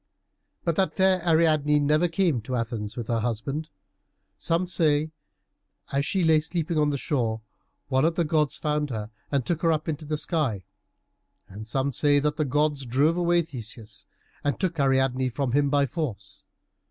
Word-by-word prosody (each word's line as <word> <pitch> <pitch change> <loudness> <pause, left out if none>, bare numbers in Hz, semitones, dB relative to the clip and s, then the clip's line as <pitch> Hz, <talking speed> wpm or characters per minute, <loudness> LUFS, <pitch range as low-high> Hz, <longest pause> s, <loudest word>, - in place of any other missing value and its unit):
But 170 -2 -1
that 190 - +1
fair 190 -1 +3
Ariadne 155 -3 +3
never 150 +4 +3
came 165 - +1
to 125 +4 -4
Athens 115 -3 -3
with 120 - -4
her 115 -1 0
husband. 125 +7 -3 0.7
Some 170 +2 +1
say 155 -4 +2 0.9
that, 140 - -1
as 140 - -1
she 190 -2 0
lay 160 -1 +5
sleeping 165 0 -2
on 150 -1 +3
the 145 - -1
shore, 120 -7 -1 0.5
one 130 -1 +2
of 165 +1 +2
the 170 - +2
gods 150 -2 +1
found 150 -1 -1
her 110 -3 -5 0.2
and 140 -4 0
took 170 -2 -1
her 165 - +3
up 155 -1 -1
into 155 -1 -3
the 150 +1 -2
sky, 145 - 0 0.8
and 105 +3 -9
some 135 +5 -1
say 145 +1 +3
that 150 +1 0
the 155 - +1
gods 145 +1 +1
drove 140 +7 +2
away 175 -1 +2
Theseus, 115 -7 -8 0.4
and 145 - -1
took 180 -4 -1
Ariadne 130 -1 +2
from 130 +1 -2
him 140 +2 +2
by 140 0 +3
force. 140 - -5
145 Hz, 175 wpm, -26 LUFS, 130-160 Hz, 0.9 s, lay